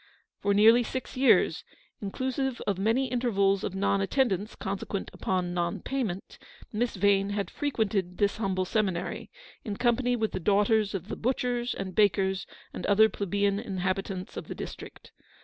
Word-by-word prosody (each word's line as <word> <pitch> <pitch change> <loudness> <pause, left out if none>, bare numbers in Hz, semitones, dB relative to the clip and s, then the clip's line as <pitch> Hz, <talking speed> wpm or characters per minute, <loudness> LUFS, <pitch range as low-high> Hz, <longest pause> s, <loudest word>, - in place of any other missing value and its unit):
For 200 0 +1
nearly 225 +4 +7
six 255 +2 -5
years, 260 +1 +4 0.4
inclusive 260 +5 -2
of 195 -2 -1
many 225 +7 +2
intervals 205 -6 +1
of 190 - -3
non 195 0 +1
attendance 205 -2 0
consequent 195 0 -4
upon 180 -2 -1
non 175 -1 -1
payment, 225 -9 -4 0.3
Miss 235 +3 -1
Vane 200 -1 +3
had 200 -1 -2
frequented 205 - -1
this 205 -1 +1
humble 190 -3 0
seminary, 190 -3 -1 0.3
in 210 -4 -4
company 245 +1 +2
with 220 -2 -1
the 185 - -3
daughters 205 +3 +2
of 190 0 -5
the - - -4
butchers 245 0 -1
and 190 -1 -5
bakers 190 -1 +2 0.3
and - - -6
other 220 +2 +6
plebeian 200 0 0
inhabitants 190 +1 -3
of - - -6
the - - -6
district. - - -9
205 Hz, 150 wpm, -28 LUFS, 195-235 Hz, 0.4 s, nearly